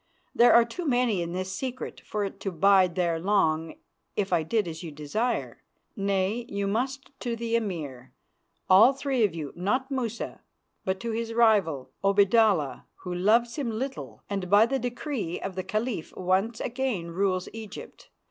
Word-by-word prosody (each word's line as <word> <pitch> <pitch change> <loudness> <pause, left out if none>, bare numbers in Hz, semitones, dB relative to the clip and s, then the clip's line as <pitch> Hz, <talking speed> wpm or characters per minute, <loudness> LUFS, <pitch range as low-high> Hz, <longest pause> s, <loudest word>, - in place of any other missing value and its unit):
There 240 - +6
are 235 0 +7
too 330 +8 -5
many 245 -7 +2
in 170 0 -3
this 185 +1 -3
secret 255 +4 -5
for 210 -1 -3
it 195 0 -7
to 195 0 -3
bide 185 0 +4
there 170 -3 +1
long 165 -4 +1 0.4
if 195 -3 -1
I 170 - +4
did 210 +5 0
as 160 -1 -6
you 165 -3 -7
desire. 155 +12 -2 0.3
Nay, 200 +3 0
you 200 0 -2
must 260 +8 -2
to 240 -1 -2
the 230 0 -2
Emir, 150 - -3 0.6
all 205 +8 +7
three 270 -3 0
of 195 -6 +1
you 150 -4 -5
not 255 +10 -1
Musa, 235 -4 -3 0.4
but 190 0 -1
to 235 - -3
his 230 0 -3
rival, 185 - +3
Obaidallah, 200 - +3 0.2
who 180 - -4
loves 225 - +2
him 275 -5 -1
little, 260 +5 -5
and 195 -3 -3
by 205 +3 +7
the 270 +3 -1
decree 245 - -3
of 195 - -5
the 185 0 -4
Caliph 215 -2 -3
once 190 +5 0
again 240 -9 -2
rules 185 0 0
Egypt. 220 -2 -9
200 Hz, 165 wpm, -27 LUFS, 180-235 Hz, 0.6 s, are